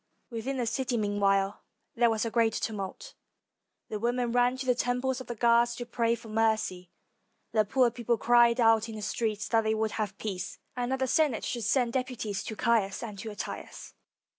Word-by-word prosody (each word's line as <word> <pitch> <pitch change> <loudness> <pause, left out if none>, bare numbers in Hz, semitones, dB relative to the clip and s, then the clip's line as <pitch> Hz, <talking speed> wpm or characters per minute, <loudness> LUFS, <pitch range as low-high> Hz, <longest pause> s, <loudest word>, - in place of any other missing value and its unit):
] - - -44
Within 240 +4 -3
the 245 - 0
city, 255 +1 -1
meanwhile, 200 -1 +1 0.3
there 235 0 +3
was 220 0 0
a 230 - -2
great 225 -2 +2
tumult; 215 - -4 0.8
the 215 - -3
women 240 +1 0
ran 245 +1 +2
to 260 - -4
the 250 - +4
temples 250 +2 -1
of - - -10
the 240 - -4
gods 235 +1 +3
to 240 - -5
pray 235 0 +1
for 230 - -13
mercy, 215 -5 0 0.6
the 215 -1 +3
poorer 245 +3 +3
people 235 0 0
cried 240 +1 +4
out 225 -1 +4
in 220 - -6
the 215 - -6
streets 215 -1 -2
that 225 -1 +3
they 220 0 +1
would 220 0 0
have 210 -2 -3
peace, 195 -4 -5 0.2
and 245 0 -2
that 265 - +1
the 260 0 0
Senate 285 -4 +2
should 235 -3 -3
send 240 +1 +2
deputies 250 -6 -2
to 220 - -5
Caius 215 -3 +1
and 210 -4 -7
to 220 +2 -5
Attius. 205 - -7
230 Hz, 200 wpm, -29 LUFS, 215-245 Hz, 0.8 s, the